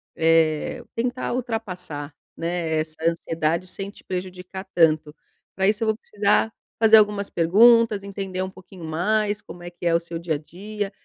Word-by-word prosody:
eh, 165 +7 +2
tentar 245 +2 -2
ultrapassar, 185 - -4 0.2
né, 165 -2 -1
essa 155 0 -3
ansiedade 165 +1 -1
sem 195 +2 -5
te - - -15
prejudicar 185 +1 -6
tanto. 155 -3 +3 0.4
Para 190 +1 +2
isso, 215 +2 +1
eu - - 0
vou 215 - +1
precisar 210 0 +1 0.3
fazer 220 0 +8
algumas 205 -1 +2
perguntas, 215 +4 +5
entender 195 -2 -4
um 190 - -2
pouquinho 185 -2 -12
mais 210 +6 0
como 175 - -11
é 175 - -6
que 175 0 -10
é 170 - +3
o 170 - +4
seu 170 0 -7
dia 165 -2 -2
a - - -1
dia, 200 +6 -6
185 Hz, 170 wpm, -23 LUFS, 165-210 Hz, 0.4 s, fazer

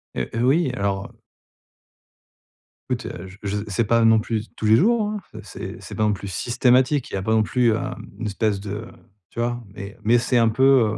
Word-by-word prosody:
Heu - - -2
heu, 115 +1 0
oui 145 0 +3
alors 100 -3 -1
heu - - -20 1.8
écoute 120 -3 -2 0.2
je 95 +1 -13
j 100 0 -2
c'est 105 +3 0
pas 115 +2 +3
non 115 0 +6
plus 110 0 -3
tous - - -5
les 110 +1 +6
jours, 225 - +3
hein, 210 -1 -4 0.2
c'est 100 - -8
c'est - - -9
pas 110 - 0
non 105 - +3
plus 100 0 -6
systématique, 125 +6 +2
il - - -11
y - - 0
a - - -2
pas 110 - -1
non 110 -1 +4
plus 120 0 +2
un 130 +2 -3 0.2
une 115 - -4
espèce 105 0 0
de 105 +2 -5 0.4
tu - - -9
vois? 120 0 -1
Mais 100 +2 -8
mais 115 +3 +4
c'est 125 +1 +1
un 115 -1 +4
peu, 125 -2 +4
115 Hz, 215 wpm, -23 LUFS, 105-125 Hz, 1.8 s, non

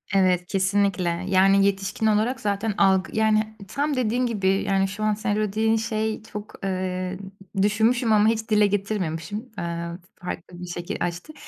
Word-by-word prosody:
Evet, 180 -2 +3
kesinlikle. 190 -2 +1
Yani 195 +1 +5
yetişkin 195 +2 -1
olarak 220 +4 +2
zaten 205 +1 -1
algı 190 -1 +3
yani, 215 0 +2
tam 290 +6 -1
dediğin 250 0 +1
gibi, 210 -5 -1
yani, 195 0 +2
şu 205 +3 -5
an 215 0 +2
sen 205 0 -1
o - - 0
dediğin 215 +2 +1
şey 220 -1 -2
çok, 210 -1 -8
eee, 185 -1 -2 0.4
düşünmüşüm 220 +3 +2
ama 210 0 +5
hiç 225 0 0
dile 210 -1 +5
getirmemişim, 195 -3 -2 0.2
eee, 170 -1 -3 0.4
farklı 175 0 -7
bir 180 - -6
şekil 175 +3 -5
açtı. 175 - -4
200 Hz, 155 wpm, -24 LUFS, 185-220 Hz, 0.4 s, Yani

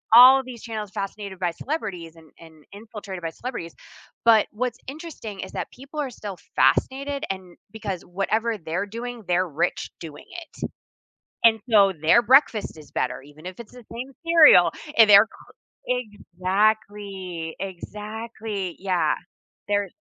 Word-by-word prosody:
all 260 +2 +10
these 245 -3 -10
channels 215 -4 -5
fascinated 195 -1 -5
by 175 -2 0
celebrities 180 - -5
and 160 -2 -17 0.2
and 160 - -16 0.2
infiltrated 210 -5 -8
by 165 - -1
celebrities, 170 -4 -7 0.5
but 225 -2 +6
what's 245 +2 -3
interesting 290 - -8
is - - -12
that - - -4
people 280 +4 -9
are 275 - -2
still 205 -5 -7 0.2
fascinated 275 - +2
and 190 -1 -3 0.3
because 205 -5 -5
whatever 215 +5 -1
they're 170 +3 -3
doing, 235 +1 -6
they're 180 +1 +2
rich 170 +3 -1
doing 155 -3 -9 0.2
it, - - -25 0.9
and 225 -2 +6
so 200 -3 +6
their 235 +8 +7
breakfast 230 - +3
is 150 - -14
better 130 - -1
even 145 +3 -16
if 185 0 -7
it's 230 - -11
the 245 -2 -13
same 250 +3 -6
cereal. 325 - +7 0.3
And 220 -2 +8
they're 200 +2 +9
cr - - -18 0.4
Exactly, 200 -5 -1
exactly, 210 0 -5
yeah. 180 -5 +1 0.6
Their 205 -1 +1
205 Hz, 145 wpm, -24 LUFS, 180-235 Hz, 0.9 s, all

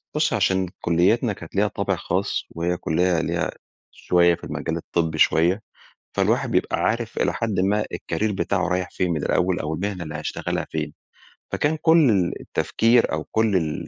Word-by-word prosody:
بُصّي، - - +2
عشان 95 -1 +1
كليتنا 95 +7 +2
كانت 85 0 -12
ليها 105 +2 +3
طابع - - -1
خاص، - - -2
وهي 85 +1 -2
كلية 85 +1 +1
ليها 85 -1 -1 0.4
شوية 85 -1 +3
في - - -22
المجال 80 0 -3
الطبي 80 -1 -2
شوية، 90 +7 +3 0.6
فالواحد - - +1
بيبقى - - +1
عارف 115 0 -1
إلى - - +1
حدٍ 110 -5 -1
ما 105 +3 +2
الكارير 110 0 -2
بتاعه 95 -2 0
رايح 90 0 -1
فين 90 -1 -1
من 80 -4 -1
الأول، 90 0 +1
أو 80 +1 -2
المهنة 95 0 -3
اللي 75 -1 -7
هيشتغلها - - -3
فين، - - -3 0.6
فكان 155 +2 0
كل 160 -5 +5
ال 95 -5 +1
التفكير 115 +1 +2
أو 80 0 -2
كل 110 -3 +1
ال 80 -4 -1
90 Hz, 170 wpm, -23 LUFS, 85-105 Hz, 0.6 s, كل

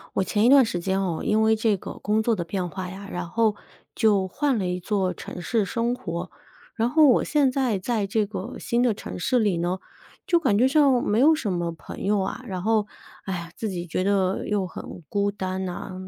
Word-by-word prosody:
我 190 - +2
前 210 0 +1
一 240 - +6
段 275 -2 +7
时 195 -5 -3
间 190 +1 0
哦， 175 -4 -2
因 215 +1 +2
为 220 0 +4
这 215 -2 +1
个 - - -8
工 215 +1 0
作 225 +1 +1
的 175 - -3
变 180 +1 -3
化 185 0 -5
呀， 195 +2 -9
然 175 -1 -5
后 220 +2 +2 0.4
就 205 -4 +3
换 270 +4 0
了 185 - -1
一 180 0 -1
座 185 0 -1
城 175 - -8
市 215 +5 +1
生 230 +5 -1
活。 170 -5 -5 0.5
然 230 +1 +1
后 310 +3 +6
我 250 - +4
现 290 -3 +2
在 255 -6 0
在 215 +1 -1
这 210 +2 +1
个 205 +3 -6
新 235 +1 0
的 245 -3 +3
城 - - -7
市 245 +8 +2
里 205 -5 +2
呢， 175 +2 -1 0.5
就 345 - +4
感 220 -12 +2
觉 250 +4 +5
上 270 -3 +4
没 205 - +1
有 310 +4 +7
什 225 -11 -1
么 175 -1 -1
朋 165 - -9
友 205 +1 +2
啊， 195 +6 -3
然 185 -5 -4
后， 215 +1 +2 0.4
哎 190 - -4
呀， 170 0 -8
自 220 - -3
己 175 -2 -5
觉 180 +3 -1
得 195 -1 +1
又 205 -3 0
很 180 - -9
孤 200 0 0
单 190 -1 -3
呐。 185 +1 -5
205 Hz, 245 characters per minute, -25 LUFS, 185-230 Hz, 0.5 s, 段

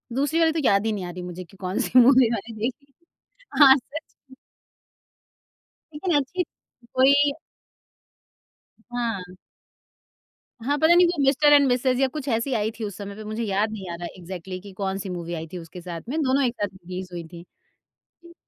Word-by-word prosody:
दूसरी 290 +5 +1
वाली 325 -1 +4
तो 320 - -2
याद 200 -1 +3
ही 220 - +1
नहीं 200 -4 -3
आ - - -6
रही 180 +1 -7
मुझे 180 0 -7
कि 180 +3 -19
कौन-सी 190 +6 +2
मूवी 250 -1 +6
मैंने 230 0 -4
देखी। 260 +6 -5 0.7
हाँ 270 -2 +9
सच 285 +4 -7 0.3
में। - - -13 1.6
लेकिन 325 +3 -1
अच्छी 290 +6 0
थी। 240 -7 -29
कोई 280 +2 +5 1.6
हाँ। 225 -7 -3 1.3
हाँ, 285 +5 0
पता 315 +3 +5
नहीं 355 0 +7
वो 340 -4 -1
मिस्टर 290 +2 +5
एंड 285 -1 +6
मिसेज़ 255 0 +1
या 270 - +4
कुछ 285 +1 -7
ऐसी 235 +3 0
आई 220 -1 0
थी - - -4
उस 205 -3 -5
समय 200 -1 -7
पे 215 - -9
मुझे 215 +2 -4
याद 210 +1 0
नहीं 195 -4 -7
आ - - -4
रहा 175 0 -6
इग्ज़ैक्ट्ली 185 +1 -7
कि 200 +1 -11
कौन-सी 195 0 -2
मूवी 175 -1 -5
आई 165 -1 -5
थी - - -4
उसके 170 +1 -10
साथ 170 -1 -6
में 310 +4 -1
दोनों 275 0 +2
एक 240 - 0
साथ 205 - +2
रिलीज़ 185 0 -7
हुई 170 -1 -5
थीं, 170 0 -11 0.8
जी। 340 - -14
225 Hz, 190 wpm, -24 LUFS, 185-275 Hz, 1.6 s, हाँ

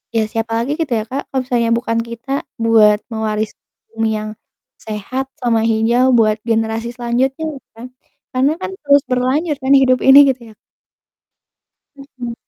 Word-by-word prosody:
ya 220 - +3
siapa 225 -1 -3
lagi 275 +5 -2
gitu 290 -7 -1
ya 215 - -2
Kak, 275 +2 -4
kalau 265 -1 -1
misalnya 235 -2 0
bukan 230 -1 -2
kita 235 +4 -5 0.2
buat 215 -2 +4
mewaris 215 -1 -2 0.4
bumi 225 0 -1
yang 215 0 -5 0.5
sehat 220 +5 -4 0.2
sama 230 -2 +1
hijau 235 +3 +2
buat 215 -1 +3
generasi 225 +1 -1
selanjutnya 255 +5 -1
gitu 265 - -19
kan, 245 +2 -8 0.5
karena 265 +4 +2
kan - - -3 0.2
terus 285 0 +5
berlanjut 270 +5 0
kan 265 +1 +2
hidup 255 -1 +3
ini 270 +1 +9
gitu 255 -2 -2
ya. - - -32 1.4
Mhm. 255 -4 -8
240 Hz, 155 wpm, -17 LUFS, 225-265 Hz, 1.4 s, ini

